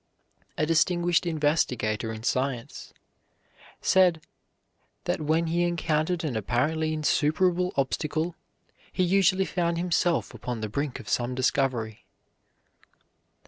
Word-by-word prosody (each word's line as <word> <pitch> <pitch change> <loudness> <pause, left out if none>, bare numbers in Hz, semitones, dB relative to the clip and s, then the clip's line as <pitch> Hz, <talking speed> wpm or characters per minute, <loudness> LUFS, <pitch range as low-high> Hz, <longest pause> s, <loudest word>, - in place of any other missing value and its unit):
A 155 - +2
distinguished 175 +2 +2
investigator 125 -9 0
in 110 0 -7
science 130 +1 -2 0.9
said 180 -3 +4 0.8
that - - -1
when 160 +2 +1
he 170 +1 0
encountered 170 0 0
an 145 -7 -2
apparently 145 +9 0
insuperable 165 +4 +1
obstacle, 155 +5 -1 0.6
he 185 - 0
usually 190 +1 +3
found 170 -2 -1
himself 175 0 0
upon 120 -3 -5
the 110 - -3
brink 140 +4 -3
of - - -11
some 125 +1 -1
discovery. 125 -4 -1
155 Hz, 105 wpm, -27 LUFS, 130-175 Hz, 0.9 s, said